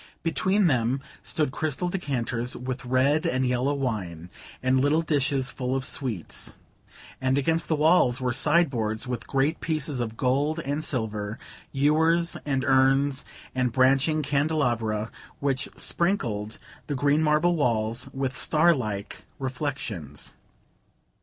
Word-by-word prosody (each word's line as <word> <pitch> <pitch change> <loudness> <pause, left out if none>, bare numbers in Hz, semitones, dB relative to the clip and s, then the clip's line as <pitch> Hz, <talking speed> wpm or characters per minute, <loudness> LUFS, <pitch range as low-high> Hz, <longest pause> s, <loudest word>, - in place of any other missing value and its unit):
Between 190 +4 +2
them 125 -4 +2 0.2
stood 150 -4 -1
crystal 155 +4 -2
decanters 125 -9 -2
with 130 +1 -5
red 130 +5 +2
and 130 0 +1
yellow 125 +3 +1
wine, 90 - -3 0.3
and 130 +1 +3
little 145 +4 +2
dishes 140 -3 +1
full 130 0 -2
of 130 -1 -1
sweets; 120 - -2 0.6
and 130 +1 +2
against 165 +4 +1
the 160 - +2
walls 150 -5 +4
were 125 -1 0
sideboards 130 -6 +1
with 125 -2 -4
great 140 +3 +1
pieces 155 -4 -2
of 115 -2 -3
gold 140 +5 +1
and 145 +3 -2
silver, 110 -5 -2 0.3
ewers 160 +4 +2
and 135 -2 0
urns 135 +1 +3 0.3
and 125 -1 0
branching 135 +4 +3
candelabra, 125 -7 0 0.3
which 135 -2 -1
sprinkled 115 - -1 0.3
the 145 - -2
green 145 +3 +2
marble 155 +3 +3
walls 120 -2 0
with 135 -1 -2
starlike 130 -12 +1
reflections. 125 - -4
135 Hz, 125 wpm, -26 LUFS, 125-150 Hz, 0.6 s, walls